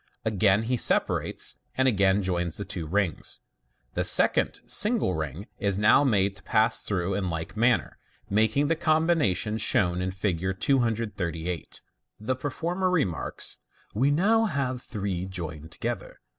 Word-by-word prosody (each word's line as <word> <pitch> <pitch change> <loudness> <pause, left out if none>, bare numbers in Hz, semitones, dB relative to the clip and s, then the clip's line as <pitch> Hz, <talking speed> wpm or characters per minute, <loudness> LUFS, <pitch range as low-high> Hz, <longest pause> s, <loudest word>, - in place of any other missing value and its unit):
Again 105 -1 +3
he 125 +2 0
separates - - 0 0.2
and 130 0 +3
again 100 -3 +3
joins 90 -2 -1
the 100 - -4
two 85 -3 -5
rings. 95 -1 -1 0.5
The - - 0
second - - +3
single 215 - +1
ring 80 +3 -4
is 100 -2 0
now 105 +7 +5
made 100 -7 +2
to - - -12
pass 110 +3 +3
through 95 -1 -1
in 95 -2 -1
like 80 +3 -5
manner, 120 +2 +1 0.3
making 110 +7 +2
the 165 - +2
combination 155 - +1
shown 90 -4 +1
in 90 - -1
Fig. 95 0 -2
238. 100 - -1 0.4
The 115 +5 -1
performer 170 +8 -2
remarks, 145 - -1 0.3
"We 130 +7 +2
now 210 +10 +3
have 135 - -2
three 95 -6 -4
joined 80 -4 -7
to - - -16
gether. - - -5
105 Hz, 145 wpm, -26 LUFS, 90-130 Hz, 0.5 s, now